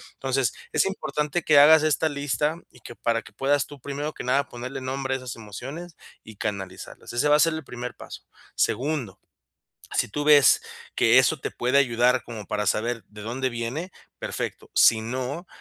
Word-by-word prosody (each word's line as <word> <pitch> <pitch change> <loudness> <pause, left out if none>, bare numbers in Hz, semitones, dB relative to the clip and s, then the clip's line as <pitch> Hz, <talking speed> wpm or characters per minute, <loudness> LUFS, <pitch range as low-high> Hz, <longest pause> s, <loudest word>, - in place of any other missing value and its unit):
Entonces, - - 0 0.2
es - - +3
importante 175 -4 -2
que 150 - +5
hagas 155 +2 +8
esta 155 +1 +2
lista 145 +1 -1
y - - -19
que 120 - -10
para 115 0 0
que 100 - -14
puedas 140 +5 +1
tú, 145 -1 -12
primero 145 +3 -4
que - - -7
nada, 135 +3 +1
ponerle 125 +3 -6
nombre 135 +1 -2
a - - -1
esas 125 -2 -7
emociones 135 - -8 0.3
y 110 - -12
canalizarlas, 95 -1 -6
ese 120 +5 +1
va 150 - +6
a - - -2
ser 165 +1 +4
el 160 0 -5
primer 125 0 -6
paso. - - -10 0.3
Segundo, 125 -5 -1 0.8
si - - +1
tú 145 +8 -3
ves 145 -3 +6 0.3
que - - +5
eso - - +3
te - - -3
puede 125 +3 0
ayudar 125 -1 +3
como 110 -4 -8
para 105 -1 -2
saber 115 0 -1
de 105 0 -12
dónde 130 +4 -2
viene, 120 +10 -4 0.3
perfecto, - - -5
si 110 -1 +5
no, 130 +8 -4
130 Hz, 185 wpm, -25 LUFS, 115-150 Hz, 0.8 s, hagas